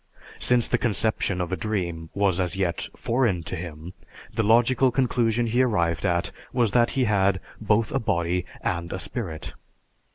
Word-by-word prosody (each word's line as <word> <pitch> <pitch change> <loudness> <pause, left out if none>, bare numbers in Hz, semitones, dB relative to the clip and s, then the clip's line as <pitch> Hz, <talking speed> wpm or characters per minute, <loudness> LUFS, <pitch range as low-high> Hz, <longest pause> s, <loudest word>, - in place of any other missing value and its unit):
Since 125 -1 +4
the - - +1
conception 110 -4 0
of 90 0 -2
a - - +1
dream 90 -7 -3
was 100 -2 +2
as 90 -1 +1
yet 90 -3 -1
foreign 115 -8 0
to - - -4
him, 85 0 -7 0.4
the - - +1
logical 120 +4 +4
conclusion 120 -2 +1
he 120 +2 +2
arrived 85 -10 +1
at 85 0 0 0.2
was 120 -4 +1
that 120 0 +3
he 130 - +3
had 100 -3 +2 0.2
both 110 0 +1
a 135 - +1
body 85 -5 0 0.2
and 85 -1 -2
a - - -3
spirit. 95 -6 -5
100 Hz, 165 wpm, -25 LUFS, 85-120 Hz, 0.4 s, Since